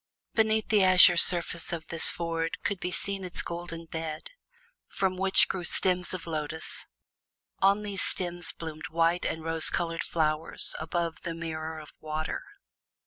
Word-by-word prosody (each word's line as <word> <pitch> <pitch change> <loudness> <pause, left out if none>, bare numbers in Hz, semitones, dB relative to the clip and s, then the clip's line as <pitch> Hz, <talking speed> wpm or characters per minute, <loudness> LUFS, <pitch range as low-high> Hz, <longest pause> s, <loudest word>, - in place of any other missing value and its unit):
Beneath 220 -1 +1
the 210 -3 +4
azure 185 -1 +6
surface 170 0 +1
of 165 -2 -5
this 165 - +5
ford 165 -1 -3
could 200 -2 -2
be 180 - -3
seen 195 +1 -1
its 180 -1 +1
golden 170 -1 -6
bed, 160 - -6 0.6
from 190 -1 -2
which 190 +1 +4
grew 185 - -4
stems 180 0 +3
of 185 -2 -3
lotus; 160 -1 -5 0.7
on 200 +2 +3
those 200 -2 -4
stems 175 -1 +1
bloomed 160 -1 -8
white 165 +1 +1
and 160 - -5
rose 165 0 +1
colored 165 -1 -2
flowers 155 -1 +3
above 165 +1 -3
the 170 -2 -5
mirror 160 -1 -6
of 155 -1 -12
water. 155 0 -4
170 Hz, 150 wpm, -27 LUFS, 160-185 Hz, 0.7 s, azure